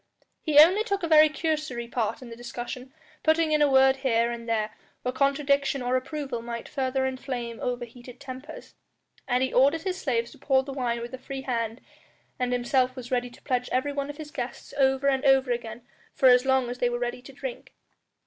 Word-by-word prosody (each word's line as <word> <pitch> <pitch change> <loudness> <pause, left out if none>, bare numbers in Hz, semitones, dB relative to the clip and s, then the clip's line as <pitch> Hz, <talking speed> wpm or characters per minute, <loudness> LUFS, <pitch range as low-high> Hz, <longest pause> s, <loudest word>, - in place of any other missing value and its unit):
He 300 -2 0
only 360 +8 +8
took 400 -4 -2
a - - +1
very 310 -1 +7
cursory 305 -6 -2
part 235 +1 -2
in 240 - -10
the - - -7
discussion, 245 +2 -7 0.3
putting 315 0 +3
in 305 -1 +3
a 295 - +5
word 265 0 +5
here 235 -3 +1
and 235 -1 -6
there 215 -1 0 0.3
where 250 - 0
contradiction 275 0 +1
or 250 +1 +1
approval 265 -2 -3
might 235 0 -6
further 265 -1 -1
inflame 255 -3 -4
overheated 245 0 -6
tempers. 275 +3 -9 0.5
And 250 0 +2
he 260 - -1
ordered 280 +5 +4
his 375 -1 -3
slaves 235 -4 -1
to - - -16
pour 265 -1 +2
the 275 0 -7
wine 240 -3 -1
with 240 +2 -7
a 260 - -6
free 270 +1 -6
hand, 230 -2 -2 0.6
and 250 -1 0
himself 250 +1 +1
was 250 -1 -8
ready 245 -1 0
to 245 - -18
pledge 250 -2 -1
every 275 +3 0
one 280 0 -3
of 290 - -7
his 300 -1 -8
guests 255 -5 -6
over 270 0 +2
and 270 -1 +2
over 270 -2 +4
again 235 -1 -4 0.3
for 260 - +6
as 250 +1 +5
long 265 -2 +2
as 250 - -7
they 245 - +2
were 240 - -2
ready 240 0 -3
to 260 - -12
drink. - - -8
260 Hz, 205 wpm, -26 LUFS, 245-280 Hz, 0.6 s, only